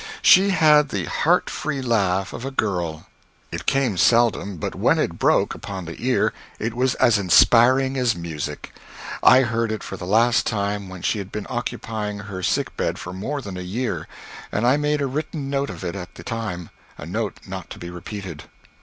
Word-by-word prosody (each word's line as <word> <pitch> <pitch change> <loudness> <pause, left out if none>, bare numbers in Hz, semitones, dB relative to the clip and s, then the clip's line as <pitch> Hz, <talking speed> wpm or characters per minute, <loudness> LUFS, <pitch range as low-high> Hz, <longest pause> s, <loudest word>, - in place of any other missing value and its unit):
She 195 +2 +7
had 150 -5 +5
the 95 -7 -2
heart - - +2
free 145 -2 -3
laugh 100 -7 0
of - - -7
a 135 - -3
girl. 90 -11 -2 0.5
It - - -6
came 130 -8 +1
seldom, 100 -1 +3
but - - -4
when - - +2
it - - -1
broke - - +3
upon 95 -3 -7
the 80 +5 -8
ear 130 0 +2 0.2
it 110 +1 -3
was 125 +1 +1
as 110 -3 +4
inspiring 125 +8 +5
as 125 -3 +2
music. 85 -4 -6 0.5
I 130 - +7
heard 115 -2 0
it 110 - -4
for - - -6
the 90 - -7
last 115 +4 +3
time 100 -2 -2
when 90 -1 -9
she 110 - 0
had 100 0 -7
been 105 -1 -5
occupying 105 -2 -3
her 100 -3 -7
sickbed - - -1
for 90 - -7
more 135 +10 -4
than 95 -4 -6
a - - -5
year, 110 +8 -3 0.4
and 105 - 0
I 125 +3 +5
made 150 0 0
a - - +1
written 145 +1 -4
note 140 0 0
of - - -8
it 85 0 -3
at 90 -2 -8
the - - -10
time 105 -8 -5 0.3
a - - -8
note 105 +5 -3
not 95 -2 -7
to - - -8
be 85 0 -8
repeated. 90 -2 -7
110 Hz, 195 wpm, -22 LUFS, 95-130 Hz, 0.5 s, She